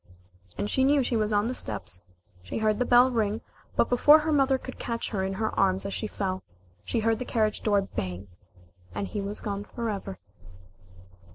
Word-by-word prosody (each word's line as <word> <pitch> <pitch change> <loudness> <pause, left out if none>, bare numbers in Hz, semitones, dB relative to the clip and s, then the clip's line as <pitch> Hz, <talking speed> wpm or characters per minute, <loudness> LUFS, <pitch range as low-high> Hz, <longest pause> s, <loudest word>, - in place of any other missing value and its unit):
And - - -1
she 260 +5 +1
knew 280 0 +4
she 245 - -1
was 215 -1 +1
on 205 +1 +2
the 250 - -1
steps. 105 - -3 0.4
She 90 - -5
heard 215 -1 +1
the 250 - +2
bell 245 +2 +6
ring, 220 -2 0 0.3
but - - +3
before 290 +5 +7
her 315 0 -1
mother 270 -2 +3
could 260 - -9
catch 230 -1 -3
her 195 -4 -1
in 190 0 -2
her 220 +3 -2
arms 190 0 +3
as 200 - -3
she 215 - -2
fell, 190 -3 -3 0.4
she 230 - -1
heard 225 0 +1
the - - -2
carriage 220 -3 0
door 205 -2 +2
bang, 95 - -5 0.7
and 100 -1 -2
he 205 - -4
was 200 +1 -2
gone 200 -1 -3
forever. 205 -4 -4
215 Hz, 195 wpm, -27 LUFS, 195-245 Hz, 0.7 s, before